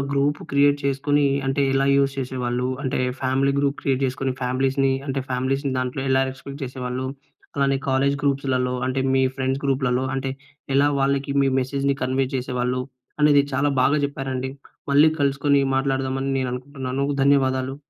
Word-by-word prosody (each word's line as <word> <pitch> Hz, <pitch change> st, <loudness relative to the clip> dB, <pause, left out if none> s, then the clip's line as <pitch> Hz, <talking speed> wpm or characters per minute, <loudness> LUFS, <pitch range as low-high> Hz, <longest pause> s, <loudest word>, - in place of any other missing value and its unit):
Group 140 Hz, +1 st, +1 dB
create 145 Hz, 0 st, +4 dB
చేసుకొని, 145 Hz, +1 st, +1 dB, 0.2 s
అంటే 135 Hz, +1 st, +1 dB
ఎలా 135 Hz, 0 st, +2 dB
యూజ్ 140 Hz, 0 st, +2 dB
చేసేవాళ్ళు. 125 Hz, -1 st, -2 dB
అంటే 130 Hz, 0 st, -1 dB, 0.2 s
ఫ్యామిలీ 135 Hz, +1 st, +1 dB
గ్రూప్ 140 Hz, 0 st, +1 dB
క్రియేట్ 135 Hz, -1 st, 0 dB
చేసుకొని 130 Hz, +1 st, -2 dB
ఫ్యామిలీస్‌‌‌ని 135 Hz, +2 st, +1 dB
అంటే 135 Hz, 0 st, -1 dB
ఫ్యామిలీస్‌‌‌ని 135 Hz, +2 st, -1 dB
దాంట్లో 130 Hz, +1 st, -2 dB
ఎలా 130 Hz, 0 st, +4 dB
ఎగ్జిక్యూట్ 140 Hz, +1 st, -9 dB
చేసేవాళ్ళు. 130 Hz, 0 st, -4 dB, 0.5 s
అలానే 140 Hz, -1 st, +2 dB
కాలేజ్ 135 Hz, +1 st, +2 dB
గ్రూప్స్‌లలో 135 Hz, -2 st, 0 dB
అంటే 130 Hz, +1 st, -1 dB
మీ 130 Hz, -, +3 dB
ఫ్రెండ్స్ 135 Hz, +1 st, -1 dB
గ్రూప్‌లలో 130 Hz, -2 st, +1 dB
అంటే 135 Hz, 0 st, -2 dB, 0.4 s
ఎలా 140 Hz, +1 st, +4 dB
వాళ్ళకి 140 Hz, 0 st, 0 dB
మీ 135 Hz, -, +3 dB
మెసేజ్‌‌ని 140 Hz, +1 st, -1 dB
కన్వే 130 Hz, +1 st, +1 dB
చేసేవాళ్ళు 125 Hz, 0 st, -2 dB, 0.4 s
అనేది 145 Hz, -1 st, +6 dB
చాలా 140 Hz, +2 st, +2 dB
బాగా 145 Hz, +3 st, +3 dB
చెప్పారండి. 135 Hz, -2 st, -3 dB, 0.4 s
మళ్ళీ 145 Hz, +3 st, +6 dB
కలుసుకొని 140 Hz, 0 st, +2 dB, 0.2 s
మాట్లాడదాం 135 Hz, -1 st, 0 dB
అని 135 Hz, 0 st, -1 dB
నేను 130 Hz, -1 st, -1 dB
అనుకుంటున్నాను. 135 Hz, 0 st, -4 dB, 0.2 s
ధన్యవాదాలు. 135 Hz, -1 st, +2 dB
135 Hz, 150 wpm, -23 LUFS, 130-140 Hz, 0.5 s, అనేది